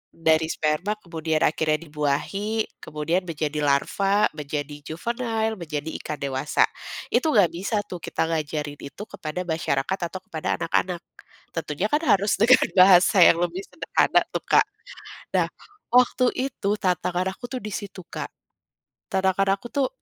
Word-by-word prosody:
dari 160 -1 +3
sperma 160 +6 0
kemudian 160 -3 -1
akhirnya 155 0 +2
dibuahi, 165 +8 -1 0.2
kemudian 155 +4 -1
menjadi 155 -2 -2
larva, 195 +8 +2
menjadi 145 -1 -5
juvenile 225 +4 -2
menjadi 155 -2 -4
ikan 150 - -4
dewasa, 135 +2 +1 0.5
itu - - +2
gak 195 -5 +5
bisa 190 +6 -3
tuh 180 - -8
kita - - -2
ngajarin 150 -2 -3
itu 140 +9 -8
kepada 180 -3 -5
masyarakat 160 +1 -1
atau 185 +2 -7
kepada 160 -1 -2
anak-anak, 175 +1 -1 0.5
tentunya 165 +3 -2
kan 295 +8 +1
harus 200 +1 +4
dengan 255 +3 +6
bahasa 185 +1 +7
yang 170 - +7
lebih 175 +2 -1
sederhana - - +2
tuh - - -1
Kak, - - +6 0.7
nah - - +2 0.4
waktu 250 0 +4
itu 255 -6 -2
tantangan 185 -1 0
aku 245 - -9
tuh 255 -2 -4
di 210 -1 -5
situ 195 -4 -6
Kak, - - -6 0.8
tantangan 190 +1 +2
aku 200 - -10
tuh, 275 -2 +1
175 Hz, 140 wpm, -24 LUFS, 155-200 Hz, 0.8 s, bahasa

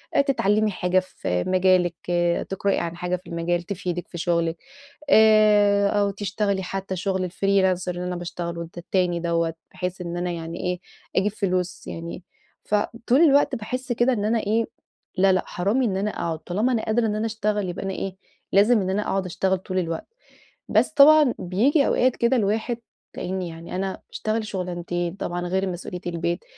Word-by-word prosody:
آآ - - +6
تتعلمي 215 -6 +2
حاجة 180 0 +2
في 90 - -3
مجالِك، 185 -2 +3
آآ، 175 0 +1
تقرأي 195 +1 -1
عن 170 0 -3
حاجة 180 0 -1
في 180 -1 -11
المجال 170 0 -1
تفيدِك 180 -2 -4
في 170 - -9
شغلِك، 170 0 0 0.5
آآ، 210 -2 +6
أو 205 -1 +2
تشتغلي 200 0 -1
حتّى 190 +1 -4
شغل 185 0 -1
الFreelancer 190 -2 +1
اللي 180 0 -3
أنا 180 0 -3
باشتغله 170 -1 -5
الت 170 +1 -9
التاني 175 0 0
دَوَّة، 170 -1 0 0.2
بحيث 180 0 -4
إن 175 0 -4
أنا 175 0 -1
يعني 165 0 -5
إيه، 180 0 -2 0.4
أجيب 200 +2 +3
فلوس 185 -4 -2
يعني. 170 +2 -6 0.4
فطول 235 +6 +1
الوقت 285 -4 +5
باحس 255 +3 -4
كده 240 +2 +3
إن 210 -3 -1
أنا 225 +2 +2
إيه، 220 +2 +1 0.5
لا 190 +1 +5
لأ 185 - +1
حرام 200 +9 0
إن 200 -6 0
أنا 205 +2 -1
أقعد، 165 -5 -3
طالما 210 +10 0
أنا 230 -3 0
قادرة 225 +2 +1
إن 210 - -1
أنا 215 +1 -1
أشتغل 210 -3 -1
يبقى 175 - -5
أنا 195 - -2
إيه، 190 0 -4 0.4
لازم 210 +2 +5
إن 185 - -2
أنا 195 +2 0
أقعد 195 -2 -1
أشتغل 190 +2 0
طول 185 0 -2
الوقت. 165 -2 -3 0.6
بس - - +3
طبعًا 295 -2 +7
بييجي 250 - +2
أوقات 255 0 +2
كده 235 +2 +2
الواحد 220 +2 0 0.4
لأني 185 -1 -3
يعني 165 +2 -8
أنا 190 +1 -3
أشتغل 220 0 -2
شغلانتين، 175 -2 -3
طبعًا 175 -2 -3
غير 190 +2 0
مسؤوليّة 180 0 -6
البيت، 170 +1 -2
190 Hz, 175 wpm, -24 LUFS, 175-210 Hz, 0.6 s, طبعًا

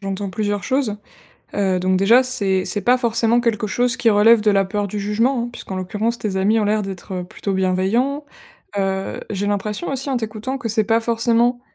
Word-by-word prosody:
j'entends 195 0 -4
plusieurs 205 +1 -2
choses. 260 -6 -1 0.6
Heu, 190 -2 +1
donc 185 +1 +1
déjà, 225 +7 +5
c'est 195 -7 +1
c'est 205 - 0
pas 250 +5 +3
forcément 235 -1 +2
quelque 225 -3 0
chose 240 +3 0
qui 240 -2 +3
relève 215 +2 +5
de 210 - +3
la 195 -1 +2
peur 205 +1 -2
du 205 +2 -4
jugement, 230 +5 0
hein, - - -5
puisqu'en 215 -4 -8
l'occurrence 215 +5 -2
tes 200 -3 -3
amis 210 +4 +2
ont - - 0
l'air 210 +1 +1
d'être 190 -1 -6
plutôt 195 +2 -5
bienveillants. 195 +10 0 0.5
Heu, 195 0 -2
j'ai 205 -1 -2
l'impression 205 - -2
aussi, 275 +1 -3
en 255 - 0
t'écoutant, 220 +4 -4
que 230 - -4
c'est 220 0 +1
pas 225 +2 +2
forcément, 235 +1 +1
215 Hz, 200 wpm, -20 LUFS, 195-235 Hz, 0.6 s, déjà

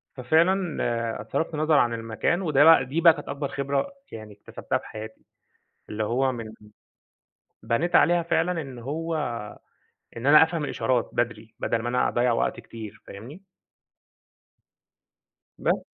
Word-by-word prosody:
ففعلًا، 130 - 0
صرفت 165 0 -1
نظر 155 +1 +1
عن 120 -4 +3
المكان، 115 - -1
وده 150 -6 +3
بقى 165 +1 +7
دي 150 +6 -2
بقى 165 -1 +8
كانت 150 -2 -10
أكبر 140 0 -3
خبرة 140 - -2 0.2
يعني 110 -1 -9
اكتسبتها 100 - -4
في - - -12
حياتي، 110 0 -10 0.6
اللي 110 0 -3
هو 130 +4 +1
من 115 -3 -7 1.1
بنيت 120 +11 -1
عليها 175 0 +4
فعلًا 165 +1 0
إن 135 -3 -10
هو 160 +7 -4 1.0
إن 115 - -6
أنا 150 +2 +8
أفهم 160 -1 -2
الإشارات 130 -4 -1
بدري 115 -2 -3
بدل 115 - -1
ما 120 - -3
أنا 125 +1 +1
أضَّيع 120 0 +1
وقت 115 - -1
كتير، 110 -2 -10
فاهمني؟ 125 - -10 2.2
بس. - - 0
130 Hz, 140 wpm, -25 LUFS, 115-160 Hz, 2.2 s, بقى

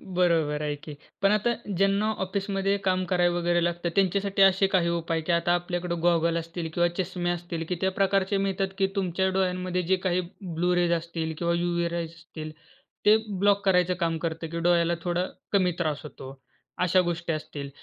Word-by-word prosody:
बरोबर 165 -4 +2
आहे 150 -1 -1
की. 145 +1 -10 0.3
पण 195 0 +4
आता 215 +3 +2 0.2
ज्यांना 195 +3 +2
ऑफिसमध्ये 195 +1 -1
काम 185 -1 +2
करावं 175 -1 +2
वगैरे 175 0 +2
लागतं 175 0 -1
त्यांच्यासाठी 195 +1 +1
असे 195 0 +5
काही 185 -3 +2
उपाय, 165 -1 -1
की 160 - -2
आता 170 +1 +2
आपल्याकडे 175 0 -2
गॉगल 170 -1 +3
असतील 165 0 -4
किंवा 175 +1 +3
चष्मे 180 -1 -2
असतील, 175 -1 -3
की 180 - 0
त्या 190 0 +2
प्रकारचे 195 +1 +1
मिळतात, 195 0 0
की 195 - +2
तुमच्या 190 -1 0
डोळ्यांमध्ये 185 -1 0
जे - - +6
काही 180 0 +2 0.2
ब्लू 175 0 0
रेज 175 -1 +2
असतील 165 -1 -3
किंवा 170 0 0
युवी 170 0 0
रेज 170 -1 -3
असतील 165 -2 -9 0.5
ते 210 +1 +8 0.2
ब्लॉक 200 0 +3
करायचं 180 -2 +3
काम 165 -2 0
करतं, 165 0 -3
की 170 - -3
डोळ्याला 170 0 +3
थोडा 175 0 0 0.3
कमी 185 -3 +3
त्रास 155 -3 -1
होतो. 135 -2 -10 0.4
अशा 180 +1 +4
गोष्टी 175 -1 -2
असतील 145 -2 -6
175 Hz, 180 wpm, -26 LUFS, 170-190 Hz, 0.5 s, ते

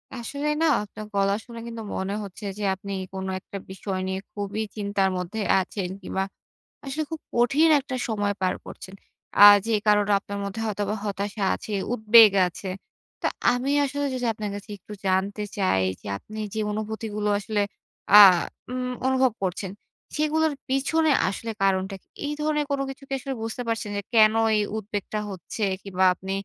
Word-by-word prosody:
আসলে 280 +5 -4
না - - +4 0.2
আপনার 215 +1 -9
গলা 200 0 +2
শুনে 235 -1 -9
কিন্তু 230 -1 -6
মনে 190 +1 -2
হচ্ছে 200 +1 -9
যে, 210 - -4
আপনি 200 +1 -8 0.2
কোন 190 0 -4
একটা 200 - -8
বিষয় 190 0 -4
নিয়ে 190 0 -2
খুবই 205 +1 -3
চিন্তার 200 -2 0
মধ্যে 180 +5 -4 0.2
আছেন 185 0 -3
কিংবা 190 +1 -2 0.6
আসলে 290 +3 -2
খুব 320 - -5
কঠিন 275 +7 +4
একটা 265 -1 -5
সময় 205 -2 0
পার 185 -1 +1
করছেন। 190 - -10 0.4
আ - - +7 0.3
যে 230 - +1
কারনে 210 0 +4
আপনার 200 0 -6
মধ্যে 200 +3 -4
হয়তোবা 205 0 -2
হতাশা 200 +1 -3
আছে, 215 - -7 0.2
উদ্বেগ 220 -1 +7 0.2
আছে। 185 +2 -7 0.5
তো - - +1 0.3
আমি 250 +3 -1
আসলে 285 +1 -2
যদি 250 -1 -2
আপনার 215 -1 -4
কাছে 205 +2 -9
একটু 205 +2 -11
জানতে 195 +3 0
চাই, 185 - +2 0.2
যে - - -10
আপনি 215 - -10
যে 220 - -2
অনুভূতিগুলো 215 0 -3
আসলে 210 0 -1 0.5
আ - - +11 0.6
উম 250 0 -2 0.2
অনুভব 260 -1 +3
করছেন, 190 +1 -2 0.5
সেগুলোর 310 +1 +2 0.2
পিছনে 300 +4 +2 0.2
আসলে 225 +3 -4
কারনটা 195 0 +1
কি? - - -41 0.2
এই 295 - -2
ধরনের 300 -1 +1
কোন 280 - 0
কিছু 270 +1 -9
কি - - -3
আসলে 270 +1 -4
বুঝতে 225 +2 -4
পারছেন? 225 -2 -2
যে - - -1
কেন 215 -1 +6 0.2
এই - - +2 0.2
উদ্বেগটা 210 0 -4
হচ্ছে? 190 +4 -6 0.2
কিংবা 190 -1 +1
আপনি 190 +2 -7
210 Hz, 170 wpm, -25 LUFS, 195-245 Hz, 0.6 s, আ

